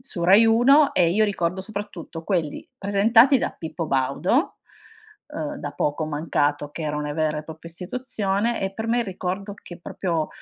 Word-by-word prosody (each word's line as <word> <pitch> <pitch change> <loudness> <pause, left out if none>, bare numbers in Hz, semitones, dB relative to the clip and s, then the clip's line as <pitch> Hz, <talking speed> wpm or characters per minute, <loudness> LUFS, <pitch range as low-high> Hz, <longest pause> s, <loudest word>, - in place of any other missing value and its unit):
su 235 -9 -4
Rai 195 +6 +7
Uno 275 +6 +5
e 175 -2 +4
io 215 +5 +3
ricordo 185 -3 -1
soprattutto 190 -5 -7
quelli 170 -6 -2
presentati 225 +7 +4
da - - -1
Pippo 165 0 -5
Baudo, 140 - 0 0.7
uhm, 300 0 -5
da 145 - -5
poco 150 +2 -1
mancato 145 -1 -1
che 160 - -7
era 150 -1 -2
una 150 0 -3
vera 155 -1 0
e 150 - -7
propria 160 +1 -10
istituzione 205 +3 -2
e 195 0 -3
per 220 +2 -4
me 235 - +2
è - - +3
il 235 - -2
ricordo 190 +2 -4
che 175 -3 -12
proprio, 170 -3 -2
185 Hz, 180 wpm, -23 LUFS, 160-220 Hz, 0.7 s, Rai